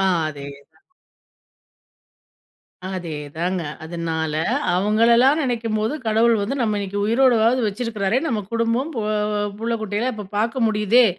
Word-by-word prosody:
ஆ - - +2 0.2
அதே 145 -2 -8
தான். 140 - -20 2.0
அதே 175 -5 -5 0.2
தாங்க. 175 +1 -1 0.2
அதனால, 160 -1 -3 0.4
அவுங்களலாம் 235 - +4
நினைக்கும்போது, 230 -2 -1
கடவுள் 225 +2 +3
வந்து 205 +7 -2
நம்ம 215 -3 +1
இன்னக்கி 200 0 -4
உயிரோடவாவது 235 +1 +3
வச்சிருக்கிறாரே! 215 0 -1
நம்ம 230 -8 0
குடும்பம் 230 +5 0
போ 230 - -2 0.6
புள்ள 230 +1 -1
குட்டிகளெல்லம் 220 +4 -2
இப்ப 210 -1 -7
பார்க்க 230 +3 0
முடியுதே! 215 +3 +4
220 Hz, 120 wpm, -22 LUFS, 195-235 Hz, 2.0 s, அவுங்களலாம்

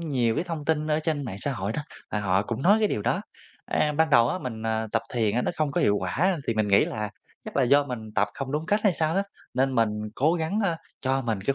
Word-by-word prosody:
nhiều 125 -8 +1
cái - - -1
thông 165 -4 -5
tin 155 -1 +1
ở 155 0 +1
trên 155 -3 -1
mạng 100 -6 -5
xã 140 - -1
hội 100 -2 -3
đó, 150 - -3 0.3
và 105 - -1
họ 95 0 +2
cũng 115 +4 -4
nói 205 +5 +6
cái 215 -2 +2
điều 105 - -2
đó. - - +1 0.5
A, 150 - +1
ban 160 +1 +2
đầu 120 -2 +6
á, 185 - -1
mình, 115 -7 -6
à, 110 0 0
tập 110 - +1
thiền 115 0 +1
nó - - +1
không 155 -2 0
có - - +1
hiệu 105 0 +3
quả 165 - +1
thì 115 - 0
mình 110 -1 +1
nghĩ 100 - +5
là 105 -1 -4 0.3
chắc - - -7
là 135 - +4
do 140 +3 +4
mình 110 -5 -6
tập 105 0 +2
không 135 0 -5
đúng 155 +2 -2
cách 205 +4 +2
hay 200 - +5
sao 160 0 0
á. 195 - +3 0.3
Nên 130 +1 +1
mình 115 -2 +3 0.3
cố 155 +6 +2
gắng, 165 +5 -1
a, 170 -4 +1 0.2
cho 135 0 0
mình 110 -5 -1
cái 135 +7 0
135 Hz, 275 wpm, -26 LUFS, 110-155 Hz, 0.5 s, nói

